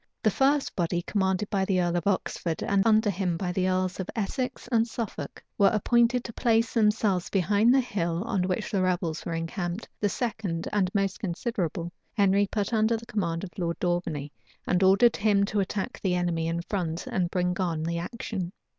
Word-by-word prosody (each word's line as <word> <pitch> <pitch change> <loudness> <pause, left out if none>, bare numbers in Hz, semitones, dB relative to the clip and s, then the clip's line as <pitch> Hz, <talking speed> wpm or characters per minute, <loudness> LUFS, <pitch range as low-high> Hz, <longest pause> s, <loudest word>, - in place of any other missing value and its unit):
The 215 - +4
first 275 +4 +2
body, 175 0 0
commanded 190 +1 0
by 195 -2 +1
the 190 -1 +1
earl 175 -1 +1
of 175 +1 -1
Oxford, 180 -4 -1
and 200 -1 +2
under 215 -1 +4
him 180 -3 -1
by 180 0 -2
the 185 +1 +1
earls 185 0 0
of 190 - -4
Essex 240 +5 -3
and 230 -1 +3
Suffolk, 230 -2 -6 0.2
were 200 - +7
appointed 235 +3 +3
to 230 - -7
place 230 -1 +2
themselves 210 -5 +2
behind 205 +5 +3
the 265 +1 +5
hill 175 -7 -2
on 195 -5 0
which 190 +3 -2
the 195 -3 +1
rebels 175 -3 -1
were 165 - -2
encamped: 175 +4 -3
the 205 - +1
second, 205 -8 -3
and 195 -3 +2
most 195 -1 0
considerable, 175 -3 -3 0.2
Henry 200 -1 +3
put 205 +2 -2
under 220 +1 +3
the 230 - -10
command 170 -7 -2
of 190 - -6
Lord 170 -1 -1
Daubeney, 170 -5 -2 0.3
and 180 0 +1
ordered 195 +5 +5
him 200 -1 +3
to 205 +1 -1
attack 195 0 -2
the 185 -2 +1
enemy 170 -2 0
in 170 +1 -2
front, 175 -4 -3
and 180 -2 -1
bring 180 0 0
on 165 -4 -1
the 170 +1 -1
action. 190 -2 -4
190 Hz, 190 wpm, -27 LUFS, 175-215 Hz, 0.3 s, were